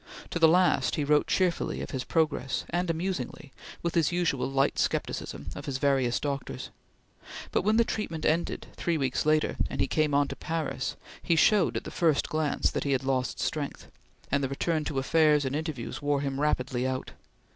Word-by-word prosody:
To 170 - -1
the 165 - +7
last 180 +3 +3
he 150 - 0
wrote 150 +1 +3
cheerfully 180 -3 0
of - - -6
his 130 -2 -2
progress, 155 -5 0
and 175 +1 0
amusingly 160 -5 -3 0.3
with 170 - -1
his 165 -1 +2
usual 170 -7 0
light 135 0 +1
scepticism, 75 +1 -2
of - - -8
his 135 -2 -1
various 135 -3 +2
doctors; 140 -2 -4 0.8
but - - +2
when 215 +4 +2
the 235 - +6
treatment 165 -9 -3
ended, 165 +3 0
three 170 -2 0
weeks 135 +1 -1
later, 155 0 +2
and - - -5
he - - +3
came 155 -2 +1
on 145 0 +3
to - - -5
Paris, 160 -1 -3 0.3
he 170 - +2
showed, 190 +2 +4
at - - -4
the - - -7
first 160 -4 +2
glance, 155 -1 +1
that - - -2
he 140 - +1
had 135 - 0
lost 130 -1 -1
strength, 145 -2 -3 0.4
and 140 +1 +2
the 135 - 0
return 155 +3 0
to 140 - -3
affairs 150 +1 +3
and 135 +1 -1
interviews 155 -6 -4
wore 145 -1 +1
him 135 -1 -2
rapidly 130 -3 0
out. 130 0 -3
150 Hz, 190 wpm, -28 LUFS, 135-165 Hz, 0.8 s, the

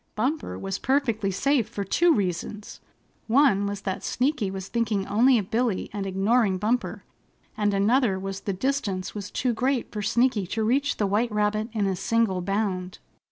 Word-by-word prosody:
Bumper 270 +9 -2
was 195 -1 -4
perfectly 240 -7 +1
safe 240 +3 +1
for 205 -3 -4
two 340 - +3
reasons. 205 - -2 0.5
One 230 -5 +4
was 200 -1 -4
that 190 -2 -4
Sneaky 255 -5 0
was 190 0 -6
thinking 220 -4 -1
only 245 +5 +4
of 200 -4 -3
Billy 230 -4 0
and 200 -2 -3
ignoring 195 +1 +2
Bumper, 225 +6 -1 0.5
and 205 -1 +1
another 205 +1 +2
was 195 0 -5
the 200 - -3
distance 200 -4 -2
was 205 -1 -6
too 250 -2 -1
great 255 +2 -1
for 210 - -4
Sneaky 225 -2 +1
to 220 +4 -2
reach 275 +6 +1
the 210 - +1
white 215 +4 +1
rabbit 210 +1 0
in 210 -3 0
a 190 -1 0
single 215 -1 +1
bound. 190 -1 -2
210 Hz, 170 wpm, -25 LUFS, 195-245 Hz, 0.5 s, One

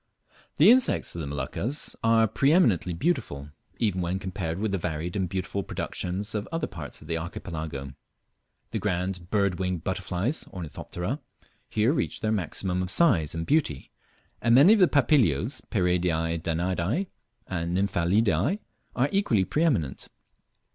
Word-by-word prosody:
The 175 +9 +7
insects 255 0 +3
of 85 - -5
the 75 - -4
Moluccas 105 - -2
are 115 0 +5
pre 125 +7 +2
eminently 110 - +3
beautiful, 85 - -2 0.3
even 100 -5 0
when 90 +2 -1
compared 95 -4 -4
with 105 +1 -1
the 95 - -1
varied 85 +1 -3
and 95 -3 -1
beautiful 95 +1 -3
productions 95 +2 -3
of 105 -1 -3
other 165 -1 -1
parts - - -7
of - - -14
the 85 -1 -1
Archipelago. 80 -5 -6 0.8
The - - -2
grand 90 -2 -2
bird 100 -4 +1
winged 90 -3 -2
butterflies 95 - -2
(Ornithoptera) 90 - -5 0.5
here 110 +6 +2
reach - - -2
their 110 -2 0
maximum 90 -1 -2
of 90 - -3
size 95 - +4
and 80 0 -3
beauty, 135 - 0 0.5
and 115 0 +4
many 150 - +8
of 225 - +3
the 185 - +7
Papilios, 120 - +2
Pieridae 85 -4 0
Danaidae, 90 - -1 0.4
and 85 -1 -2
Nymphalidae 100 - +2 0.4
are 130 +3 +2
equally 125 - +2
preeminent. 125 - 0
95 Hz, 145 wpm, -27 LUFS, 85-115 Hz, 0.8 s, many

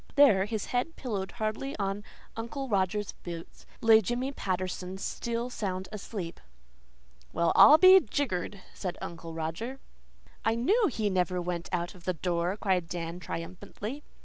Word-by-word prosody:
There, 250 -10 +6
his 215 -1 -3
head 250 +7 -1
pillowed 200 -7 -4
hardly 240 +4 -3
on 200 0 -2 0.3
Uncle 265 +5 -4
Roger's 205 -1 0
boots, 170 -1 -8
lay 225 -1 +7
Jimmy 245 +6 -1
Patterson, 185 -4 -3
still 235 +4 -3
sound 190 -4 -3
asleep! 200 -4 -6 0.9
"Well, 170 0 +2
I'll 300 - +10
be 375 +3 +9
jiggered!" 205 - -2
said 180 -2 -4
Uncle 165 -1 -7
Roger. 170 +12 -4 0.6
"I 225 - +2
KNEW 405 - +3
he 220 -7 -1
never 180 -1 +1
went 175 -1 -3
out 175 0 -1
of 180 -2 -16
the 185 - +1
door," 175 +3 -1
cried 185 -5 0
Dan 170 0 -4
triumphantly. 200 - -6
195 Hz, 145 wpm, -29 LUFS, 180-235 Hz, 0.9 s, I'll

